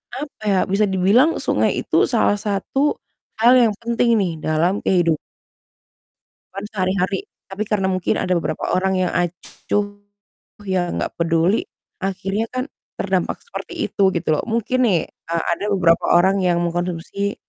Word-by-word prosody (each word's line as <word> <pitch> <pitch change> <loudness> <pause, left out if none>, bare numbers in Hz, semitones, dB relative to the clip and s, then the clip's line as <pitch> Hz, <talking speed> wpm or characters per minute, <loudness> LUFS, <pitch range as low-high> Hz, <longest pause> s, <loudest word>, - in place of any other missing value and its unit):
apa 285 -5 -7
ya, 195 -2 +3
bisa 200 +3 +2
dibilang 200 - +3
sungai - - +1
itu - - +2
salah 205 - +2
satu 215 +8 0 0.5
hal 240 +2 +7
yang 230 -3 +4
penting 235 0 +2
nih 180 -5 -1
dalam 170 +5 +1
kehidupan 170 -4 +1 1.4
sehari-hari. 190 -1 -1 0.2
Tapi 195 +2 -3
karena 195 -3 0
mungkin 185 -1 0
ada 185 -1 0
beberapa - - -3
orang 190 +1 +1
yang - - -3
acuh 205 +3 -2 0.7
yang, 180 -2 -1
nggak - - -3
peduli, 170 +4 +2 0.4
akhirnya 195 +2 -1
kan 255 0 -2 0.3
terdampak - - -1
seperti 475 - -5
itu 195 -1 +3
gitu 170 - -2
loh. - - -2
Mungkin 235 +3 +1
nih, 185 -6 +3
eee, 165 0 -4
ada 185 - -4
beberapa 170 -3 +3
orang 190 +3 +3
yang 175 -1 +2
mengkonsumsi, 175 +3 -2
190 Hz, 140 wpm, -21 LUFS, 175-210 Hz, 1.4 s, hal